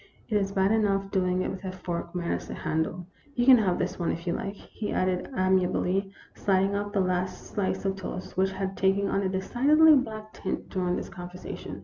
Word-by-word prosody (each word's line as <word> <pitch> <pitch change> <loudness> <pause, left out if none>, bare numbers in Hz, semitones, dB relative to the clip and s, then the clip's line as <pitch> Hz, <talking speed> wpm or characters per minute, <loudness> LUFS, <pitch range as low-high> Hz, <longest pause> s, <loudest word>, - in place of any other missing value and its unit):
It 215 - 0
is 195 -1 +1
bad 195 0 +2
enough 195 -3 +1
doing 185 -1 +1
it - - -2
with 190 - -7
a 190 - -3
fork 175 -1 -5
minus 175 -1 -2
a - - -4
handle. 160 +3 -2 0.3
You 245 - +2
can 255 -2 +9
have 190 -5 +1
this 185 +1 -2
now, 170 - -1
if 170 +1 -2
you 170 - 0
like," 200 +3 -4
he 210 +1 -6
added 185 -1 0
amiably, 185 +1 +2 0.2
sliding 195 0 +1
off 205 0 -2
the 200 -2 +1
last 185 0 -1
slice 200 -1 -1
of 195 0 0
toast, 185 -1 -6
which 190 +1 +2
had 190 0 -3
taken 195 +1 +2
on 195 - +1
a 190 - 0
decidedly 275 +12 +5
black 215 -5 -2
tint - - -4
during 180 -2 0
this - - -4
conver 180 -1 -8
sation. - - -7
190 Hz, 215 wpm, -27 LUFS, 185-200 Hz, 0.3 s, can